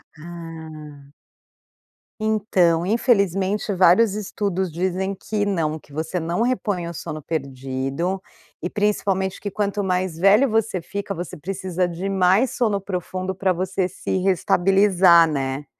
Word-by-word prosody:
Hum. 155 -3 -10 1.1
Então, 195 -6 +2
infelizmente, 200 -2 +1
vários 190 +4 +5
estudos 195 -3 -2
dizem 185 +3 -2
que 205 +2 -2
não, 160 -6 -1
que 145 - -23
você 160 +4 -2
não 170 +5 -2
repõe 205 -8 -1
o 170 - -6
sono 155 -1 -6
perdido 135 +5 -3 0.4
e 175 - -2
principalmente 195 -2 0
que 205 - -3
quanto 205 0 -2
mais 180 -2 -1
velho 200 +9 +5
você 215 -4 0
fica, 200 +3 -5
você 175 +1 -6
precisa 185 +1 -2
de 175 +3 -4
mais 195 +6 +3
sono 215 -7 0
profundo 185 0 -4
pra 190 0 0
você 185 +1 -1
se 190 - -3
reestabilizar, 185 -1 +4
né. 135 -1 -3
185 Hz, 130 wpm, -22 LUFS, 165-200 Hz, 1.1 s, vários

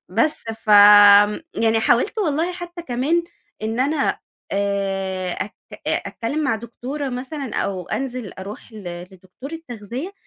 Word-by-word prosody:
بس 310 0 +1 0.2
ف 215 - -1
آمم، 205 +2 +8
يعني 225 0 +2
حاولت 245 - +2
والله 335 -1 0
حتّى 350 -1 -8
كمان، 285 +5 0 0.4
إن 225 +3 -2
أنا، 280 +1 0 0.3
آآ، 195 -2 -1
أتك 205 - -5 0.3
أتكلّم 290 +7 -2
مع 275 - +2
دكتورة 255 +5 -5
مثلًا، 260 +1 -5
أو 185 -3 -2
أنزل 255 -6 -4
أرُوح 200 +4 -9
ل 175 -5 -7
لدكتورة 220 - -9
تغذية، 245 - -6
235 Hz, 130 wpm, -21 LUFS, 200-285 Hz, 0.4 s, آمم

